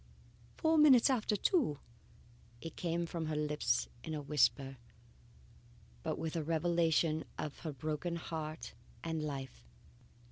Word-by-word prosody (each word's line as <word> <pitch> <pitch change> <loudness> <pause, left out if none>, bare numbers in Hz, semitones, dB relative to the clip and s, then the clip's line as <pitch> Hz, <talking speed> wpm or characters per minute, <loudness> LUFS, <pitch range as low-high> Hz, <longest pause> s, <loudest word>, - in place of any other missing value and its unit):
"Four 320 -1 +3
minutes 275 -3 +7
after 220 -4 +1
two!" 205 - +2 0.8
It 165 - -7
came 170 0 -1
from 165 -1 -3
her 155 - -1
lips 150 0 +1 0.2
in 160 - -4
a 150 - -3
whisper, 135 -1 +2 1.2
but - - -2
with 160 0 -3
a 165 - 0
revelation 165 -1 +2
of 150 - -4
her 160 - -4
broken 155 +5 -3
heart 155 -6 -5 0.3
and 160 -1 -2
life. 135 - -5
160 Hz, 130 wpm, -35 LUFS, 150-170 Hz, 1.2 s, minutes